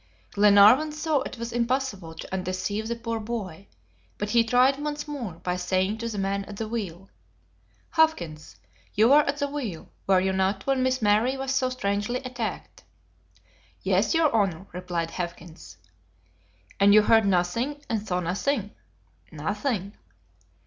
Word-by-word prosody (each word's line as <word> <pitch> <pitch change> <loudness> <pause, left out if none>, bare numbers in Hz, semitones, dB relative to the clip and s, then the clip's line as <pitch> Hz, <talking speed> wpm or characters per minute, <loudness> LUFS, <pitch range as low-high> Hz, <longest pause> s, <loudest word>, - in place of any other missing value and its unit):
Glenarvan 210 +9 +6
saw 305 -1 0
it 255 - -6
was 235 0 -5
impossible 235 -8 -2
to - - -9
undeceive 190 +3 -2
the 235 - -2
poor 230 -1 -4
boy, 200 -5 -6 0.5
but 210 0 -3
he 235 -1 +5
tried 250 +4 +3
once 295 0 -4
more 260 - -5
by 180 +2 -3
saying 185 +4 0
to 230 0 -3
the 215 - -5
man 195 0 -1
at 205 0 -9
the 220 - -3
wheel: 195 -5 -5 0.8
"Hawkins, 170 - 0 0.4
you 220 +3 +5
were 290 +2 +7
at 280 +1 -1
the 285 -1 -1
wheel, 250 - -5 0.2
were 190 -1 +5
you 190 +1 0
not, 190 +1 0
when 270 -1 +1
Miss 260 -2 0
Mary 220 +6 +3
was 270 0 -2
so 255 -1 +1
strangely 210 -1 -1
attacked?" 245 -3 -5 1.0
"Yes, - - +2
your 320 -5 +3
Honor," 190 -4 0
replied 175 -2 -3
Hawkins. 170 - -7 1.0
"And 200 +1 +6
you 215 - +7
heard 225 -1 +4
nothing, 230 +11 0
and 225 -3 -1
saw 180 -3 -2
nothing?" 205 +5 -1 0.6
"Nothing." 200 - -3
210 Hz, 150 wpm, -26 LUFS, 190-255 Hz, 1.0 s, were